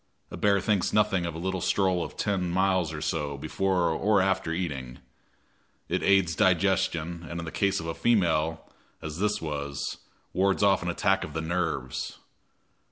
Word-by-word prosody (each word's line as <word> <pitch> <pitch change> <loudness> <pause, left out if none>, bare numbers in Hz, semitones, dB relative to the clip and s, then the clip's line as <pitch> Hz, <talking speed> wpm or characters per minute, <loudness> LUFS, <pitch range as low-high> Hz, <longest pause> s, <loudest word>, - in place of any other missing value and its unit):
A - - -5
bear 100 -1 +3
thinks 100 -1 +1
nothing 100 -5 +2
of 85 - -5
a - - -5
little 95 +2 -2
stroll 95 -3 +1
of - - -8
ten 95 -4 0
miles 95 -2 +1
or 75 -1 -6
so 75 -4 -2
before 90 +2 0
or 100 +6 +2
after 95 -3 +1
eating. 70 -8 -4 0.9
It - - 0
aids 95 -4 +3
digestion, 90 -3 +1
and 85 - -4
in 85 -1 -5
case 100 -1 +1
of 85 - -6
a 80 - -2
female, 80 -8 +1 0.4
as 80 +1 -5
this 105 -2 0
was, 70 -2 -4 0.4
wards 95 +2 +2
off 100 -1 +4
an 90 - -2
attack 95 +3 +1
of 75 - -7
the 80 - -2
nerves. 80 -6 -2
90 Hz, 165 wpm, -27 LUFS, 80-95 Hz, 0.9 s, off